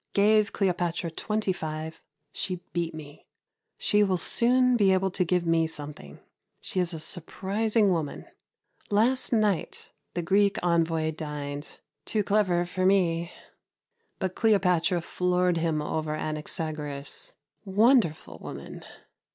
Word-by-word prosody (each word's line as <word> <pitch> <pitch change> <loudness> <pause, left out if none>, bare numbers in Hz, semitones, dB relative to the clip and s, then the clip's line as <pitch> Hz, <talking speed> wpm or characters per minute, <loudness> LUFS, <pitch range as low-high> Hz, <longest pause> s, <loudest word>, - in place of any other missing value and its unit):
Gave 210 +1 +4
Cleopatra 175 -3 -1
25. 160 -5 -3 0.3
She 185 - -2 0.2
beat 170 -2 -2
me. 150 -1 -11 0.5
She 210 - +2
will 190 -2 +1
soon 250 +7 +3
be 200 -4 +4
able 190 0 +1
to 185 - 0
give 180 0 0
me 165 -1 +2
something. 145 - -8 0.4
She 185 - 0
is 180 -1 +1
a 165 - -5
surprising 200 +6 +1
woman. 160 -5 -2 0.6
Last 235 +6 +2
night 210 -6 0 0.2
the 175 - -1
Greek 200 +3 +3
envoy 165 -2 +1
dined. 145 -2 -6 0.3
Too 215 -2 0
clever 190 -4 +2
for 185 +1 -3
me, 175 -3 +2 0.9
but 185 -1 -2
Cleopatra 180 -5 +2
floored 180 0 0
him 160 -2 0
over 155 0 -2
Anaxagoras. 155 - -4 0.3
Wonderful 210 - +2
woman! - - -9
180 Hz, 120 wpm, -27 LUFS, 160-200 Hz, 0.9 s, Gave